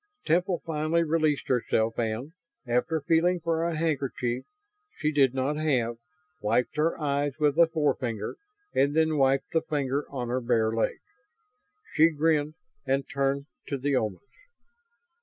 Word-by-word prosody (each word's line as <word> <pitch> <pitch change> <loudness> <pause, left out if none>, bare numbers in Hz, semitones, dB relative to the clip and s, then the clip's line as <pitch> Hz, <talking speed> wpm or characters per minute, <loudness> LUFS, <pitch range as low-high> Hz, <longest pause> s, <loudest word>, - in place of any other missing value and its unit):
Temple 180 +1 +1
finally 160 +1 +1
released 155 -2 +1
herself 115 -2 +1
and, 115 +5 -2 0.3
after 125 +6 0
feeling 170 +4 +2
for 165 0 -1
a 170 -2 -1
handkerchief 135 -6 -1 0.5
she 155 0 0
did 135 -4 +3
not 135 +3 0
have, 125 -7 0 0.4
wiped 120 +6 +1
her 160 +3 +1
eyes 145 -1 0
with 150 -2 +2
a 170 - +7
forefinger 140 -8 -1 0.4
and 140 +2 +2
then 160 -1 +3
wiped 135 0 +2
the 160 - +2
finger 140 -1 -2
on 125 -3 -4
her 130 +1 0
bare 115 -2 +2
leg. 115 - 0 1.0
She 160 +2 +6
grinned 155 -1 +1 0.3
and 135 0 0
turned 140 0 -1 0.2
to 140 - -2
the 140 +1 0
Omans. 110 -6 -1
145 Hz, 140 wpm, -27 LUFS, 125-160 Hz, 1.0 s, a